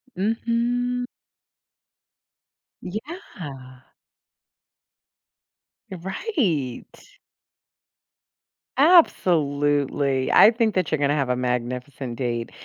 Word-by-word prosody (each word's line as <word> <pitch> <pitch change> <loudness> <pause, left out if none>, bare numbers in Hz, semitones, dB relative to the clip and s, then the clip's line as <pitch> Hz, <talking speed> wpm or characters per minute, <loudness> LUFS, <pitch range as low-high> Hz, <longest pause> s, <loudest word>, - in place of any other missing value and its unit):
Mhm. 235 +4 -1 1.8
Yeah. 170 - -9 2.1
Right. 185 - -2 1.9
Absolutely. 145 - +3
I 215 - +8
think 225 -2 0
that 185 - 0
you're 155 - +2
gonna 145 0 +1
have 140 -4 -1
a 125 - +1
magnificent 125 +1 -3
date 120 -3 -3
150 Hz, 60 wpm, -23 LUFS, -, 2.1 s, I